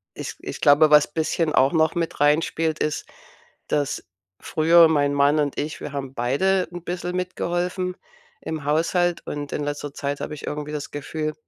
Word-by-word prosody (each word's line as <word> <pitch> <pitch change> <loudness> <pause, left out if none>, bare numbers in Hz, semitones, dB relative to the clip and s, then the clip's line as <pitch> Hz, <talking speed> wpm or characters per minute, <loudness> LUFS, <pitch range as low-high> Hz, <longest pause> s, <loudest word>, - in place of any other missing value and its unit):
ich - - -6
ich - - -7
glaube, 145 +2 +6
was 150 -1 +7
bisschen 160 0 0
auch 135 +1 +4
noch 160 -1 +2
mit 170 -1 -2
reinspielt, 155 +2 +1
ist, 150 0 -1 0.6
dass 145 -1 -1 0.4
früher 165 +1 +5
mein 145 -2 +2
Mann 145 +2 +3
und 145 -2 -1
ich, 150 +1 -4
wir 145 - -6
haben 135 -2 -5
beide 180 +11 +1
'n 175 -1 -8
bissel 180 0 -4
mitgeholfen 180 0 -2 0.5
im 155 -3 -5
Haushalt 170 +3 +1
und 145 -1 -5
in 150 - -2
letzter 145 0 -4
Zeit 140 0 -3
habe 150 - -4
ich 145 - -9
irgendwie 150 0 -4
das 150 -1 -5
Gefühl, 155 +1 -4
155 Hz, 175 wpm, -23 LUFS, 145-170 Hz, 0.6 s, was